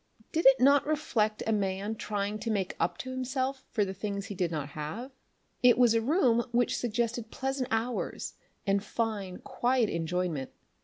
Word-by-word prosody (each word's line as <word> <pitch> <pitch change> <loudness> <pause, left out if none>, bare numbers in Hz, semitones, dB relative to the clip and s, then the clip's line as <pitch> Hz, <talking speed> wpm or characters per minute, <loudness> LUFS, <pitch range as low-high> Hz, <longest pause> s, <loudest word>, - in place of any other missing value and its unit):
Did 325 -3 +3
it 270 0 +7
not 280 +3 +5
reflect 225 -8 0
a 225 - +1
man 200 +1 -1
trying 205 0 -2
to 225 +2 -3
make 195 -4 -1
up 165 - 0
to 260 - -5
himself 260 +1 -2
for 210 -3 +1
the 190 - -4
things 200 0 -4
he 205 - -6
did 180 -3 0
not 150 -3 -3
have? 155 - -5 0.5
It 245 -2 +6
was 245 -2 +5
a 230 - +3
room 240 -3 +3
which 240 +1 +2
suggested 235 -1 -1
pleasant 265 0 -2
hours 230 +2 -2 0.3
and 200 -1 +2
fine, 210 -4 -2
quiet 245 -3 +1
enjoyment. 170 -4 -1
225 Hz, 170 wpm, -30 LUFS, 195-250 Hz, 0.5 s, it